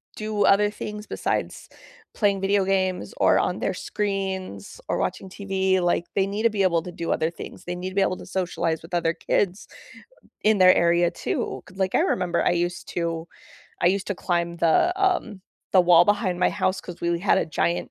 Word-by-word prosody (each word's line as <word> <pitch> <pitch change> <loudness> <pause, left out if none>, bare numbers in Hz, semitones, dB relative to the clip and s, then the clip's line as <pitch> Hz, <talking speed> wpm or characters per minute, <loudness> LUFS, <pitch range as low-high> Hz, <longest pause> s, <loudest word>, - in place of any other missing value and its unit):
do 215 -1 -1
other 205 +1 +4
things 210 0 -7
besides - - -3 0.5
playing 200 -3 +1
video 195 0 +2
games 185 -1 -1
or - - +4
on - - -1
their - - -1
screens 190 - -4
or - - 0
watching 190 - -3
TV, 190 -1 0
like, 175 -1 +1
they 195 -1 +3
need 205 +3 -3
to 230 - +5
be 205 -3 0
able 170 -3 +2
to 180 - -7
do 170 -1 -4
other 160 - +1
things, 170 - -10
they 175 0 -4
need 180 +1 -4
to 190 - -11
be 200 - +3
able 185 -1 +1
to - - -10
socialize 180 -3 -2
with 165 +2 -14
other 165 -1 +1
kids 190 +3 -1 0.8
in 215 0 +4
their 185 0 +8
area 170 +1 +3
too, - - -3
'cause, 190 - -16
like, 190 -1 0
I - - +4
remember 180 -2 0
I - - +3
used 175 0 -2
to 165 -1 -2 0.6
I - - +4
used 195 +1 0
to 200 - -1
climb 170 -1 -1
the, 165 - +3
um, 365 - 0 0.3
the 190 - +7
wall 175 -1 +6
behind 205 -4 +1
my - - +4
house 185 +1 -1
'cause 175 -1 -10
we 170 0 0
had 200 - +3
a - - +1
giant 170 +2 -1
185 Hz, 205 wpm, -24 LUFS, 175-200 Hz, 0.8 s, their